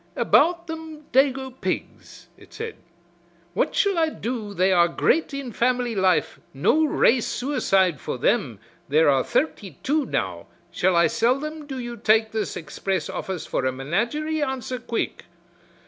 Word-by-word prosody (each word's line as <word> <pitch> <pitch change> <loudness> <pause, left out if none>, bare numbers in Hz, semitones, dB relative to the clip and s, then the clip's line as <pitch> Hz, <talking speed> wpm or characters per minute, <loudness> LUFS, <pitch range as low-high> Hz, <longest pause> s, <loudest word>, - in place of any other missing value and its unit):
"About 340 0 +3
them 320 -2 -8
dago 265 0 +2
pigs," - - -5
it - - -18
said, 450 0 -5 0.8
"what 185 - 0
shall 395 -4 +2
I 320 -1 +3
do 230 -7 -4
they 185 +1 +3
are 175 -2 +5
great 315 - +1
in 275 -3 -5
family 245 0 0
life, 190 -3 +1 0.2
no 305 - +3
race 255 -4 +3
suicide 195 - +1
for - - -4
them, 125 - +1 0.3
there 155 +2 +4
are 135 -2 +2
thirty 225 - -2
two 295 +1 +1
now - - -3 0.2
shall 185 0 +1
I 170 0 +5
sell 235 - +2
them 305 0 -6
do 270 -2 -5
you 240 -1 -5
take 220 0 +3
this 220 -1 -3
express 170 +2 -3
office 185 -4 -4
for - - -2
a 130 - +1
menagerie, 235 - -1
answer 260 -2 -3
quick." 235 -2 -3
240 Hz, 155 wpm, -24 LUFS, 185-290 Hz, 0.8 s, are